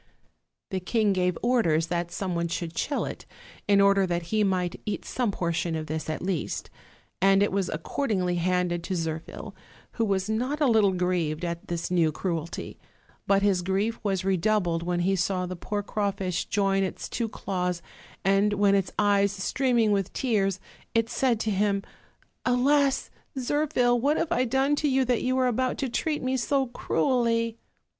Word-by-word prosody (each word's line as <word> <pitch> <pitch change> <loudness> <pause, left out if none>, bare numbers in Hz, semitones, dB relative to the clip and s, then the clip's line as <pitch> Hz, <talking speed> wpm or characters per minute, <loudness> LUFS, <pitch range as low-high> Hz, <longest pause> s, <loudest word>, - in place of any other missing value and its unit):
The 190 - -1
king 210 +2 +1
gave 180 -2 +1
orders 195 -11 +2
that 170 0 -2
some 185 0 -3
one 170 0 0
should 170 0 -4
shell 285 - -1
it, - - -7 0.4
in 200 -1 +5
order 200 -1 +4
that 175 -1 -1
he 215 -1 +3
might 185 -3 -1
eat 210 - -4
some 250 -3 -1
por 170 -3 -1
tion 165 0 -1
of 155 -1 -3
this, 155 +1 -4
at 155 - -3
least; 185 -4 -3 0.5
and 195 +1 +5
it 205 - +1
was 195 -1 0
accordingly 180 - -1
handed 175 -1 0
to 190 - -2
Zirphil, 160 -1 -5 0.4
who 230 - 0
was 195 -2 0
not 250 +7 -1
a 300 - +3
little 220 -6 +4
grieved 180 -3 -1
at 170 0 -5
this 175 0 -3
new 165 -3 +3
cruelty; 170 -1 -4 0.5
but 200 0 +3
his 195 -3 +3
grief 195 +5 -1
was 190 -3 -1
redoubled 185 -2 +1
when 175 0 -1
he 190 +2 +2
saw 185 0 0
the 185 0 -5
poor 205 +4 -3
craw 205 0 -1
fish 190 -3 -2
join 195 -1 +1
its 190 - -3
two 230 -2 -2
claws; 180 -4 -3 0.4
and 195 +2 +3
when, 200 -1 +3
its 195 -2 +1
eyes 200 -1 +3
streaming 230 +3 +1
with 195 -2 0
tears, 195 -7 0 0.4
it 230 +1 +2
said 245 -4 +1
to 220 - 0
him: 200 0 +1 0.6
"Alas! 270 +2 +2 0.3
Zirphil, 250 -2 +1
what 290 +4 +2
have 330 0 -1
I 255 -7 +2
done 265 +4 +2
to 300 - +1
you, 265 -1 +2
that 245 -1 +1
you 255 +1 0
are 260 - +3
about 255 +1 0
to 270 - -2
treat 300 +4 -1
me 260 +1 0
so 270 +2 +1
cruelly?" 230 -2 0
200 Hz, 180 wpm, -27 LUFS, 180-235 Hz, 0.6 s, in